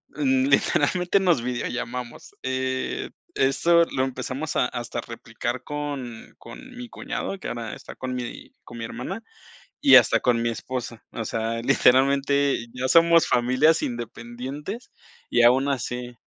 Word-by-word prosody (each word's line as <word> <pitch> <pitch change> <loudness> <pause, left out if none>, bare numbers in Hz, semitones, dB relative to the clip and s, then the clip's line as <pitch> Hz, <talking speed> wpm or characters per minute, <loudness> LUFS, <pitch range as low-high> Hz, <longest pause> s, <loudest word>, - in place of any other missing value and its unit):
mm, 265 -2 +2
literalmente 180 -8 +2
nos 175 -10 +2
videollamamos. 125 0 -5
Eh, 130 0 -2 0.3
eso 170 +6 +4
lo 130 - -1
empezamos 130 +3 -4
hasta 120 -1 -1
a - - -2
replicar 120 +2 -5
con 140 -6 -6
con 260 -1 -12
mi 245 -1 -8
cuñado, 195 - -4
que - - -6
ahora 115 -2 -5
está - - -11
con 130 0 -4
mi 120 -1 -6
con 120 - -11
mi 115 - -4
hermana 195 - -6 0.6
y 280 - +8
hasta - - +6
con 120 -2 +2
mi 120 - +1
esposa. 120 -1 -5
O 115 - -5
sea, 115 +1 -2
literalmente 135 +1 +3
ya 125 +1 -2
somos 165 +3 +5
familias 130 +6 +3
independientes 125 - -6 0.4
y 120 - +3
aun 130 +3 +5
así 125 -2 -3
130 Hz, 140 wpm, -24 LUFS, 120-150 Hz, 0.6 s, y